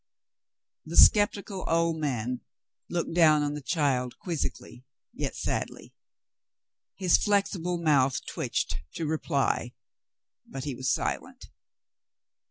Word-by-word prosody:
The 165 +2 -4
sceptical 205 -2 +5
old 165 0 +1
man 125 -5 -2 0.5
looked 170 -1 -2
down 155 -3 +5
on 145 0 -1
the 150 - -5
child 135 -5 0
quiz 170 -5 -4
zically, 125 - -7 0.3
yet - - -4
sadly. - - -4 1.0
His 185 -3 +3
flexible 195 -4 0
mouth 140 -6 +2
twitched - - -2 0.2
to 165 - -3
reply, 145 -5 -1 0.7
but 135 -1 -8
he 145 -2 -3
was 130 +1 -2
silent. - - -3
155 Hz, 110 wpm, -28 LUFS, 135-175 Hz, 1.0 s, sceptical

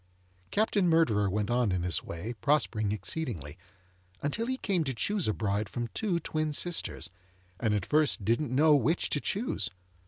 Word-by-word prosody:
Captain 205 -3 +2
Murderer 110 -12 +3
went 105 +3 -1
on 120 -4 +2
in 90 -1 0
this 90 -1 +1
way, 90 +8 -5
prospering 115 -8 +1
exceedingly, 100 - -3 0.7
until 225 +11 -1
he 260 0 -1
came 195 -9 0
to 135 -4 -2
choose 200 - 0
a - - +3
bride 100 -1 -1
from 120 +1 -3
two 190 -6 -1
twin 155 -1 -2
sisters, 175 - -1 0.5
and 110 -3 +1
at 100 - -1
first 150 -9 +2
didn't 120 +5 +1
know 150 +4 +5
which 160 +4 +1
to 145 - +1
choose. 220 +6 -1
130 Hz, 165 wpm, -30 LUFS, 105-165 Hz, 0.7 s, know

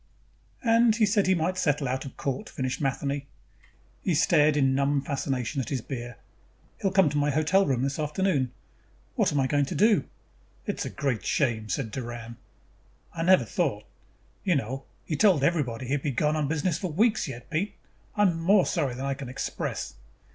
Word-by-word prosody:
"And 230 -1 +4
he 225 -1 +4
said 205 -1 +2
he 190 - +4
might 180 +3 -1
settle 145 -4 +1
out 130 +2 -2
of 135 - -9
court," 135 -2 -3
finished 130 +1 -3
Matheny. 140 0 -1 0.7
He - - 0
stared 150 0 +4
in 140 - +4
a - - +4
numb 140 +1 +1
fashion 135 -2 -2
at - - -5
his 135 -4 -2
beer. 120 -4 -6 0.6
"He'll 195 - +2
come 190 -2 +4
to 145 - 0
my 145 0 +2
hotel 155 +7 +3
room 130 -2 +1
this 140 +3 -2
afternoon. 150 -4 0 0.6
What - - +2
am 145 - +1
I 135 - +2
going 145 +1 +2
to - - -5
do?" 210 -8 +4 0.6
"It - - -3
is - - -2
a - - -3
great 135 -6 -2
shame," 115 -6 0
said 110 - -2
Doran. 120 -1 -6 0.8
"I 165 - -4
never 185 +2 +5
thought.... - - -1 0.6
You 185 -4 +2
know, 135 +1 -3 0.2
he 155 - -2
told 180 -5 +4
everybody 135 -7 0
he 130 - -2
would 145 - 0
be 145 - -1
gone 150 +4 +1
on 150 -2 0
business 160 +2 0
for 185 - -3
weeks 215 +5 +2
yet. 125 -3 -9
Pete, 175 +6 -1 0.4
I 205 - +3
am 175 -4 +2
more 190 +3 +5
sorry 130 -4 -1
than 130 +2 -4
I 140 - 0
can 135 -2 -7
express." 130 - -4
145 Hz, 200 wpm, -27 LUFS, 130-175 Hz, 0.8 s, never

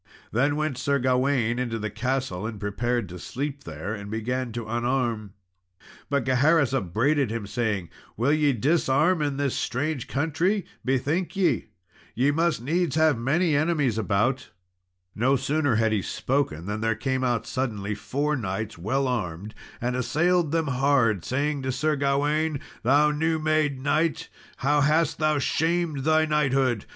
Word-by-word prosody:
Then 140 +6 +2
went 150 -4 -2
Sir 140 +1 +1
Gawain 125 -2 +1
into 120 -3 -2
the 110 -1 -4
castle, 115 -3 -2
and 110 -3 -7
prepared 120 +3 -1
to 90 +1 -8
sleep 140 - -5
there 80 +6 -5
and 100 -2 -7
began 120 +3 -2
to 120 -1 -4
unarm; 120 -3 -1 0.8
but 140 -3 0
Gaheris 135 +2 +3
upbraided 130 - +1
him, 110 -1 -3
saying, 105 -4 -2 0.3
"Will 130 +7 +2
ye 150 -2 +3
disarm 150 - +2
in 145 -2 -1
this 140 -2 0
strange 140 +1 -2
country? 165 - 0 0.2
bethink 145 +7 0
ye, 175 - +1 0.5
ye 130 +5 +3
must 165 -4 0
needs 165 +1 0
have 155 -2 +4
many 150 +7 +1
enemies 145 -7 +1
about." 110 +6 0 0.6
No 130 +5 +2
sooner 145 -1 +1
had 110 0 +2
he 105 -2 +1
spoken 125 - -1
than 105 +2 -3
there 115 0 +1
came 130 +3 -1
out 120 -3 0
suddenly 110 -6 -2
four 145 +8 -1
knights, 105 - -4
well 130 +9 0
armed, 105 -4 -3 0.3
and 125 +1 -1
assailed 160 +5 +1
them 165 -1 +1
hard, 125 -7 +2
saying 140 - -1
to 130 0 -2
Sir 150 +4 0
Gawain, 145 +2 +1 0.2
"Thou 145 +5 +4
new 160 +2 0
made 155 -3 +1
knight, 150 +4 0 0.3
how 145 +2 +2
hast 155 +2 +2
thou 155 -1 +2
shamed 160 +1 0
thy 155 0 +4
knighthood! 135 -7 +1
135 Hz, 155 wpm, -25 LUFS, 115-150 Hz, 0.8 s, have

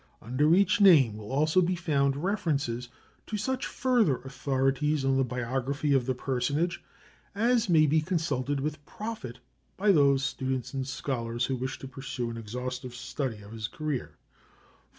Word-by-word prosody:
Under 145 +8 +2
each 200 +2 +3
name 145 - +7
will 105 +2 -8
also 155 +6 +3
be 180 +1 +1
found 140 -4 0
references 145 - -1 0.4
to 215 - -3
such 260 +5 -2
further 240 - +2
authorities 135 +2 0
on 135 0 +3
the 135 - +3
biography 130 +4 -1
of 130 -2 +2
the 130 - 0
personage 140 +7 -1 0.5
as 230 0 +2
may 160 -3 +6
be 155 +2 +3
consulted 145 -5 -1
with 150 0 -3
profit 210 - -6 0.4
by 205 +1 +4
those 140 -5 +4
students 130 -1 -2
and 135 -1 -3
scholars 120 -3 -2
who 130 - -1
wish 130 +1 -4
to 135 - -8
pursue 130 -2 -5
an 115 - -6
exhaustive 125 +3 -5
study 125 -3 -4
of 100 - -12
his 110 -1 -4
career. 150 0 -4
135 Hz, 155 wpm, -28 LUFS, 125-160 Hz, 0.5 s, name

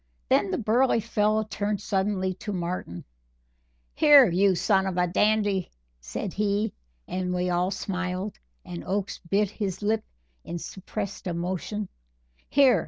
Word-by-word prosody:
Then 200 - +3
the - - 0
burly 235 +3 +3
fellow 215 -1 +1
turned 205 -1 -2
suddenly 190 -2 0
to 205 +3 -6
Martin: 175 - -4 0.9
"Here, 290 -4 +8
you 190 +2 +4
son 190 +2 +2
of 185 -2 -3
a 180 - +3
dandy!" 205 0 +2 0.3
said - - -5
he, 205 0 0 0.3
as 185 0 -2
we 180 0 0
all 180 +1 +1
smiled 185 0 -3 0.3
and 85 -1 -6
Oakes 195 0 -2
bit 195 +3 0
his 205 -2 -4
lip 215 +1 +1 0.4
in 175 - -5
suppressed 195 +3 -6
emotion, 185 +4 -3 0.6
"here! 265 -7 +5
195 Hz, 135 wpm, -26 LUFS, 180-210 Hz, 0.9 s, Here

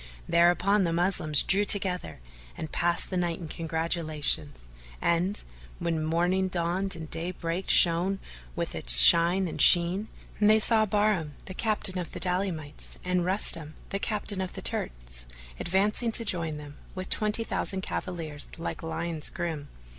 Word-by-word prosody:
Thereupon 175 +4 +3
the 170 - 0
Moslems 165 -4 +3
drew 200 +2 +3
together 190 - +1 0.4
and 155 - -6
passed 175 +2 -1
the 185 - -1
night 175 -2 -1
in 170 - -8
congratulations, 155 - -1 0.3
and, 175 +4 0 0.3
when 165 -2 -2
morning 175 +4 0
dawned 185 +2 -2
and 160 -1 -8
daybreak 170 +2 -4
shone 175 +3 +3 0.4
with - - -3
its - - +6
shine 170 - +6
and - - -3
sheen, 180 +4 +5 0.3
they 215 +1 +5
saw 220 0 +4
Bahram, 205 -7 0
the 190 - -7
captain 205 -3 0
of 175 - -6
the - - -4
Daylamites, 180 -5 -3
and 180 -1 0
Rustam, 170 -5 0
the 195 - -2
captain 205 -2 -2
of 185 - -5
the - - -7
Turks, - - -2 0.3
advancing 210 +6 0
to 230 - -2
join 165 -6 -1
them, 145 -1 -11 0.2
with 185 0 -6
twenty 215 +1 0
thousand 190 -3 -3
cavaliers 165 -6 -5
like 165 - -5
lions 165 -1 -4
grim. 160 -4 -5
175 Hz, 145 wpm, -27 LUFS, 160-190 Hz, 0.4 s, its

